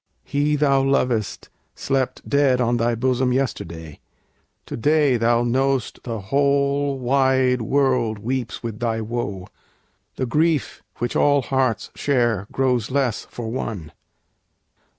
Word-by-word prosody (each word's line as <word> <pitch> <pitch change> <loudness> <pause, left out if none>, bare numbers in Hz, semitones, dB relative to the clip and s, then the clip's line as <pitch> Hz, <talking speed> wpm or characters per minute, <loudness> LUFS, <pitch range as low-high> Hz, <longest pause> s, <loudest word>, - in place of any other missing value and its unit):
He 145 +2 0
thou 140 -2 +3
lovedst 125 -5 0 0.3
slept 135 -2 -2
Dead 140 -3 +3
on 120 -1 +1
thy 120 0 +1
bosom 130 +1 +1
yesterday; 85 - -3 0.7
to - - -6
day 145 +1 +3
Thou 120 +1 +2
know'st 130 +1 0
the 115 -3 -5
whole 140 +5 +1
wide 130 -1 +2
world 125 -2 +1
weeps 125 +3 -4
with 115 -2 -5
thy 115 -2 -1
woe; 110 -4 -4 0.7
The 130 - -2
grief 155 +4 0
which 120 - -3
all 145 -2 +3
hearts 130 -2 0
share 120 -8 0
grows 125 -4 0
less 130 -4 -1
for 115 -2 -6
one. 105 -10 -5
125 Hz, 125 wpm, -22 LUFS, 115-135 Hz, 0.7 s, thou